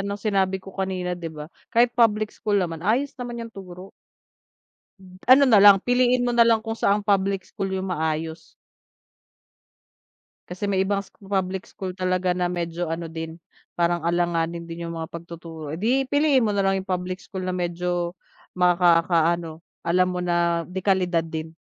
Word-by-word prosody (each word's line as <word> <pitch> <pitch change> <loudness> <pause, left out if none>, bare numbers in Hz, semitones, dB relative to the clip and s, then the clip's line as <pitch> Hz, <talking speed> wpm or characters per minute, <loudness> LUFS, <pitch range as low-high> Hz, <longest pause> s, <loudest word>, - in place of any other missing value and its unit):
ng 200 +1 -3
sinabi 195 -2 0
ko 190 0 -12
kanina, 185 -2 -2
'di 175 -2 -5
ba, 150 -1 -8 0.2
kahit 235 +1 +3
public 215 -3 +2
school 210 -2 -1
naman, 165 -4 -1
ayos 245 +9 +1
naman 240 -1 -5
yung 225 - -14
turo. 185 -1 -10 1.1
Hmm, 185 0 -16
ano 270 +2 +8
na 220 -6 +6
lang, 205 -1 +9
piliin 245 0 +3
mo 245 - 0
na 240 - +2
lang 230 -1 +4
kung 225 - -3
saan 205 -2 +1
public 195 -1 +1
school 195 - -4
yung 190 -1 -3
maayos. 160 0 -3 2.0
Kasi 195 +3 -3
may 190 -1 +1
ibang 200 0 0
scho - - -23
public 190 -1 -2
school 190 -1 -6
talaga 185 -1 0
na, 180 0 0
medyo 175 0 -3
ano 165 0 -4
din, 160 0 -6 0.4
parang 175 0 +1
alanganin 170 -1 0
din 170 0 -7
yung 170 - -5
mga 160 +1 -5
pagtuturo, 165 -2 -8
eh, - - -5
'di 255 +7 +1
piliin 285 -3 +3
mo 210 - 0
na 200 - +1
lang 195 0 +2
yung 190 - -7
public 185 0 -2
school 190 -1 -7
na 185 0 -2
medyo 175 0 -2 0.4
makakaano, 170 -2 +2 0.2
alam 180 +2 +2
mo 180 0 -3
na, 170 -1 +1
de-kalidad 185 -3 +1
din. 160 0 -5
185 Hz, 170 wpm, -24 LUFS, 170-200 Hz, 2.0 s, lang